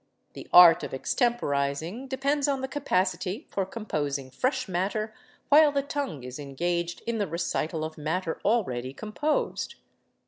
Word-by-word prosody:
The - - -9
art 175 -2 +9
of - - -6
extemporizing 165 - -1
depends 280 +2 0
on 275 -2 0
the 265 - -2
capacity 190 - -1
for 195 -2 -1
composing 145 - -3
fresh 255 - -1
matter 200 +4 -2 0.4
while 300 +1 +7
the 280 -1 0
tongue 280 - -4
is 125 +2 -7
engaged 170 +5 -2
in 230 -1 -1
the 205 - 0
recital 165 -1 -2
of 155 0 -6
matter 160 +2 -2
already 130 - 0
composed. 220 - -2
185 Hz, 140 wpm, -27 LUFS, 155-255 Hz, 0.4 s, art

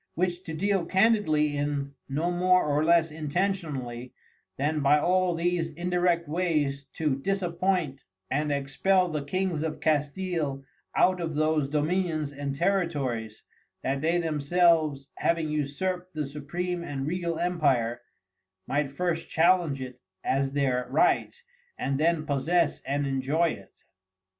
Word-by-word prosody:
Which 180 +1 -1
to 160 - -5
deal 195 +2 +1
candidly 185 -8 +3
in 145 -1 -2 0.2
no 155 +6 0
more 180 +1 +3
or 150 0 +1
less 165 -1 +4
intentionally, 150 -7 -3 0.4
than 150 +3 0
by 145 +1 +4
all 180 +2 +2
these 170 0 0
indirect 175 0 0
wayes 150 -4 0
to 150 -4 0
disappoint 180 -4 -1 0.3
and 150 +2 -1
expel 180 +7 +1
the 150 -3 -3
Kings 180 +1 -1
of 160 -1 -3
Castile 150 -1 -1 0.3
out 185 -1 +3
of 160 -2 -3
those 155 -2 +1
Dominions 155 0 0
and 140 -1 -4
Territories, 140 - -1 0.4
that 135 +1 -1
they 165 +3 +2
themselves 155 -2 +2
having 165 -2 0
usurped 180 +5 -2
the 150 -1 -1
Supreme 170 +5 -4
and 135 -4 -4
Regal 170 +1 -2
Empire, 140 -9 +1 0.6
might 140 0 -1
first 165 +2 -2
challenge 165 -4 +3
it 125 -1 -8 0.2
as 135 0 0
their 130 -3 0
Right, 360 +2 +2 0.4
and 135 0 -1
then 160 0 +2
possess 155 +3 +1
and 140 +1 0
enjoy 140 +5 +1
it. - - -9
155 Hz, 130 wpm, -27 LUFS, 140-175 Hz, 0.6 s, less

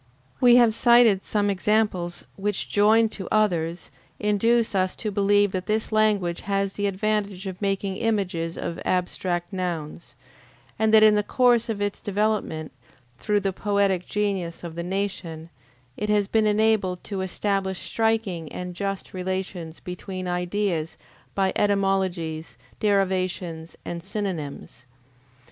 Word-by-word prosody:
We 245 -1 +7
have 240 -3 +6
cited 235 -4 +5
some 205 0 0
examples 195 -3 0
which, 205 0 -2
joined 220 +2 +4
to 190 - -6
others, 175 -5 0 0.3
induce 220 +3 +2
us 185 -1 +1
to 215 - -4
believe 205 0 +3
that 185 -1 -4
this 215 +1 0
language 210 -5 +2
has 195 0 -1
the 205 0 -1
advantage 200 -1 -1
of 190 0 -6
making 195 -1 -1
images 190 -7 -1
of 170 - -4
abstract 180 0 -1
nouns, 170 -4 -4 0.6
and 220 0 +3
that 220 0 +7
in 215 -1 +7
the 210 - +3
course 240 +1 +3
of 205 -2 -1
its 205 -1 -3
development, 205 -6 -1 0.5
through 210 -1 +1
the 195 -1 -1
poetic 200 -2 0
genius 195 -6 -2
of 170 -2 -6
the 170 - -4
nation, 175 -3 -4 0.4
it 210 +1 -3
has 205 -1 +2
been 220 +1 +2
enabled 210 -4 +2
to 195 -3 -4
establish 190 0 -1
striking 220 -8 -1
and 180 0 -5
just 195 +1 -4
relations 185 -3 -4
between 185 +1 -6
ideas 180 -2 -1 0.4
by 195 -1 +1
etymologies, 190 -5 0 0.2
derivations, 185 -5 -1
and 170 0 -4
synonymes. 170 - -5
195 Hz, 135 wpm, -25 LUFS, 180-210 Hz, 0.6 s, We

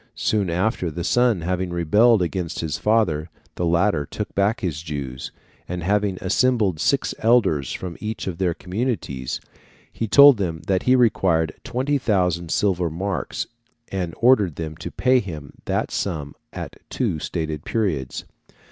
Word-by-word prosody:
Soon 100 -4 +1
after, 90 +1 0
the 85 +2 -5
son 120 -1 +2
having 90 +2 -1
rebelled 95 +6 +4
against 85 -1 -3
his 80 -2 -3
father, 90 -8 +1 0.2
the 85 - -1
latter 85 -2 +2
took - - -5
back 100 +4 +1
his 80 -7 -2
Jews, 70 -5 -5 0.4
and 90 -1 -4
having 100 0 +1
assembled 105 -4 +2
six - - +1
elders 100 - +3
from 90 -3 -5
each 110 +1 -4
of 90 -2 -4
their 90 -3 +1
communities, 90 - -3 0.5
he 115 - -2
told 140 +5 +8
them 85 -5 -3
that 95 0 +1
he 130 - +7
required 90 -10 +2
20,000 105 - 0
silver 90 -2 +1
marks, 95 +5 -3 0.5
and 90 -4 -3
ordered 105 - +4
them 80 -1 -5
to 85 - -6
pay 130 +7 +3
him 80 - -7
that - - -1
sum 75 -7 -3 0.2
at - - -7
two 80 - -1
stated 80 -2 -3
periods. 80 - -2
90 Hz, 145 wpm, -23 LUFS, 80-105 Hz, 0.5 s, told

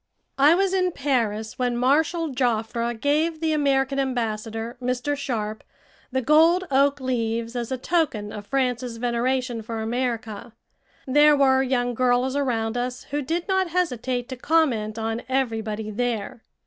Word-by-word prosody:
I 295 +4 +6
was 385 +1 +1
in 365 -2 +1
Paris 225 -7 -1
when 245 -1 0
Marshal 310 +6 +2
Joffre 235 -2 0
gave 310 +5 +1
the 320 -1 0
American 275 -2 +1
Ambassador, 225 -3 -2
Mr. 250 +3 -1
Sharp, 220 -6 -4 0.5
the 260 0 -1
gold 325 +6 +5
oak 280 +1 +3
leaves 230 -2 -2
as 240 0 -3
a 260 - -1
token 250 -8 -1
of 205 -1 -8
France's 250 -3 -1
veneration 245 0 -1
for 225 +1 -5
America. 225 -1 -3 0.5
There 295 +3 +5
were 265 -1 +4
young 245 -2 0
girls 250 +2 +1
around 240 -5 -1
us 250 +1 -3
who 290 +1 -1
did 330 +6 -2
not 380 -1 +1
hesitate 255 -8 -1
to 260 - -4
comment 245 -8 +1
on 225 +1 -2
everybody 220 -5 -2
there. 230 0 -3
250 Hz, 145 wpm, -24 LUFS, 230-285 Hz, 0.5 s, I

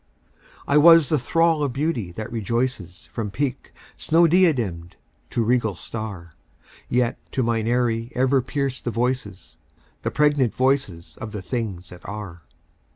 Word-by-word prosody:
I 145 +1 +4
was 165 -1 +7
the 155 - +2
thrall 165 +4 +2
of 140 -4 -1
Beauty 135 - -2
that 110 +4 -6
rejoices 115 -5 -3
From 110 -3 -3
peak 130 +5 -3 0.3
snow 165 +2 +3
diademed 125 - +2 0.4
to 115 - 0
regal 115 -3 +1
star; 90 -1 -6 0.6
Yet 120 -1 +1
to 130 - +1
mine 115 -1 0
aerie 120 -1 0
ever 130 +1 +3
pierced 135 0 -3
the - - 0
voices, 115 -7 -3 0.4
The - - -1
pregnant 145 -5 +2
voices 130 -11 -1
of 110 -2 -6
the 105 - -4
Things 95 -5 -4
That 90 - -12
Are. 100 -5 -7
120 Hz, 145 wpm, -23 LUFS, 105-135 Hz, 0.6 s, was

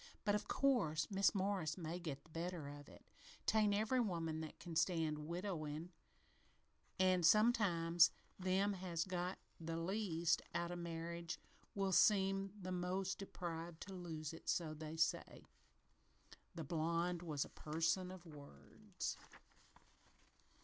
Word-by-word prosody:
But, 205 - +3
of 210 0 0
course, 165 - +2
Mis' 195 +1 +4
Morris 190 -5 0
may 170 0 -3
get 145 -6 -5
the 165 - -21
better 165 -2 -3
of 145 0 -9
it. - - -15 0.4
'Tain' 215 -2 +4
every 215 +5 +2
woman 165 -8 -1
that 155 - -7
can 170 -2 -7
stand 160 -3 +1
widowin', 170 -2 -3 1.1
an' 185 -1 +4
sometimes 175 -4 +5 0.3
them 190 +2 +2
that 195 - -3
has 175 -3 -1
got 180 0 -2 0.2
the 165 0 -3
least 170 -2 +1
out 170 0 0
of 175 - -4
marriage 170 0 -4 0.4
will 195 -1 +1
seem 195 0 +4
the 185 -1 -5
most 185 +2 -1
deprived 170 -4 -5
to 195 - -7
lose 165 -4 -5
it 165 - -7
so 160 -3 +1
they 155 +1 -6
say." 165 +1 0 1.1
The 165 - -4
blonde 170 +3 0
was 155 -5 -1
a - - -12
person 165 +4 0
of 185 -1 -9
words. 145 - -7
170 Hz, 135 wpm, -40 LUFS, 160-190 Hz, 1.1 s, sometimes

